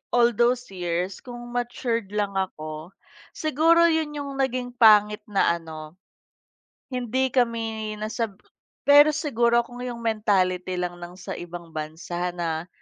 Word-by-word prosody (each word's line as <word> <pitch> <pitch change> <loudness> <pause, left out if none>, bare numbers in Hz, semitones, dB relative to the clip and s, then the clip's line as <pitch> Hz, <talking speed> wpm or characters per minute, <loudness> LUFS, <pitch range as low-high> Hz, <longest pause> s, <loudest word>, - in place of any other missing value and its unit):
all 240 0 +5
those 240 +1 +1
years, 180 0 -2
kung 240 -1 -9
matured 240 -3 -2
lang 205 -1 0
ako, 155 -4 -4 0.5
siguro 325 +3 +4
yun 315 -2 -1
yung 280 -1 -5
naging 255 -2 -1
pangit 210 -3 +5
na 190 -4 +2
ano, 160 +1 -10 0.9
hindi 255 0 0
kami 225 -3 -1
nasab 215 -1 -3 0.4
pero 290 +2 +7
siguro 240 -6 +2
kung 245 +1 -11
yung 240 -1 -5
mentality 190 -5 +1
lang 175 -1 -3
ng 175 0 -8
sa 185 - -7
ibang 175 -1 -8
bansa 160 +3 -4
na 165 -1 -3
220 Hz, 130 wpm, -25 LUFS, 180-245 Hz, 0.9 s, pero